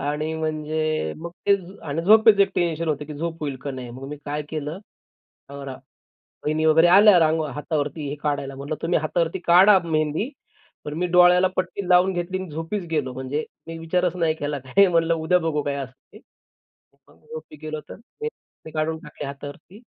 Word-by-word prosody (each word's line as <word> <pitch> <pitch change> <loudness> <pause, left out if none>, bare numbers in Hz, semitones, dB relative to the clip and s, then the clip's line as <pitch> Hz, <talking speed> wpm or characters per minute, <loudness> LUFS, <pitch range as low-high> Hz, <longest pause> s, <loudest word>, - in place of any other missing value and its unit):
आणि 150 +2 -2
म्हणजे 155 - -2
मग 170 +1 -7 0.2
ते 200 - +6 0.3
आणि 150 +3 -2
झोपेचं 215 +2 +6
एक 195 - 0
टेन्शन 165 -1 0
होतं, 150 -1 -1
की 150 0 -8
झोप 165 +2 -4
होईल 145 -3 -3
का 140 - -4
नाही 130 -2 -7
मग 130 +3 -9
मी 150 - -6
काय 150 +1 -3
केलं, 155 +2 -4 0.7
अ, 140 - -9
रा 135 -1 -6 0.7
वहिनी 155 +1 +1
वगैरे 160 +2 +6
आल्या 200 +2 +7
रां 160 -1 +3 0.2
हातावरती 150 0 -3
हे 145 - -4
काढायला. 140 -2 -2
म्हटलं 140 +3 -4
"तुम्ही 170 +1 +1
हातावरती 165 +3 -1
काढा 190 +4 +7
मेहंदी," 155 - 0 0.6
पण 150 - -4
मी 180 - +1
डोळ्याला 180 +1 +6
पट्टी 185 +1 -2
लावून 180 +1 +5
घेतली 175 +1 -2
आणि 185 - -7
झोपीच 165 +5 -4
गेलो. 145 -5 -1
म्हणजे 130 +4 -3 0.2
मी 165 0 -6
विचारच 175 +2 0
नाही 165 -3 +1
केला 145 0 -2
काय 200 +10 +5
म्हणलं, 165 -1 +2
उद्या 165 +2 +2
बघू 160 -3 -1
काय 140 -1 -2
असं 135 -2 -6 0.2
ते - - -13 0.9
झोपी 465 - -11
गेलो, 155 0 -5
तर - - -8
ते 445 - -8 0.4
ते 160 - -9
काढून 155 +1 -1
टाकली 150 -1 -8
हातावरती. 145 +8 -10
160 Hz, 185 wpm, -23 LUFS, 150-175 Hz, 0.9 s, आल्या